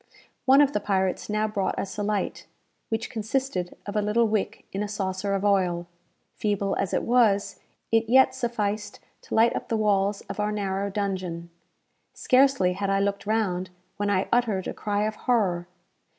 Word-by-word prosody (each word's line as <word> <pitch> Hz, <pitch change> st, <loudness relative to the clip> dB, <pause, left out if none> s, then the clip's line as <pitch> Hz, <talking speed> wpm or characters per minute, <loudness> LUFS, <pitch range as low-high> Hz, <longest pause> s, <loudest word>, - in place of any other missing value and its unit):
One 270 Hz, +2 st, +7 dB
of 285 Hz, -1 st, +3 dB
the -, -, +1 dB
pirates 190 Hz, -2 st, -1 dB
now 215 Hz, +1 st, +1 dB
brought 205 Hz, -3 st, -2 dB
us 195 Hz, -, -4 dB
a 210 Hz, -, -3 dB
light, 205 Hz, -1 st, -2 dB, 0.4 s
which 225 Hz, 0 st, -2 dB
consisted 220 Hz, -4 st, -2 dB
of 205 Hz, -, -6 dB
a 210 Hz, -, +2 dB
little 220 Hz, +3 st, +2 dB
wick 215 Hz, -2 st, -2 dB
in 195 Hz, -, -2 dB
a 210 Hz, -, -1 dB
saucer 200 Hz, -1 st, -2 dB
of 195 Hz, +1 st, -2 dB
oil. 180 Hz, -4 st, +2 dB, 0.5 s
Feeble 200 Hz, -2 st, -1 dB
as 195 Hz, -, -1 dB
it -, -, 0 dB
was, 225 Hz, -5 st, +2 dB, 0.3 s
it 225 Hz, 0 st, +2 dB
yet 265 Hz, +2 st, +6 dB
sufficed 210 Hz, -3 st, -2 dB, 0.2 s
to -, -, -5 dB
light 230 Hz, +1 st, +4 dB
up -, -, -4 dB
the 225 Hz, -, 0 dB
walls 205 Hz, -1 st, +1 dB
of 200 Hz, +1 st, -8 dB
our 210 Hz, 0 st, 0 dB
narrow 200 Hz, -1 st, -2 dB
dungeon. 185 Hz, -4 st, -3 dB, 0.6 s
Scarcely 260 Hz, -8 st, +3 dB
had 200 Hz, +1 st, -2 dB
I 195 Hz, 0 st, +2 dB
looked 200 Hz, 0 st, -1 dB
round, 190 Hz, -5 st, 0 dB, 0.3 s
when 205 Hz, 0 st, -1 dB
I 195 Hz, -1 st, +1 dB
uttered 220 Hz, -6 st, +1 dB
a -, -, -3 dB
cry 205 Hz, -1 st, -1 dB
of 215 Hz, -, -1 dB
horror. 190 Hz, -9 st, 0 dB
205 Hz, 180 wpm, -26 LUFS, 195-220 Hz, 0.6 s, One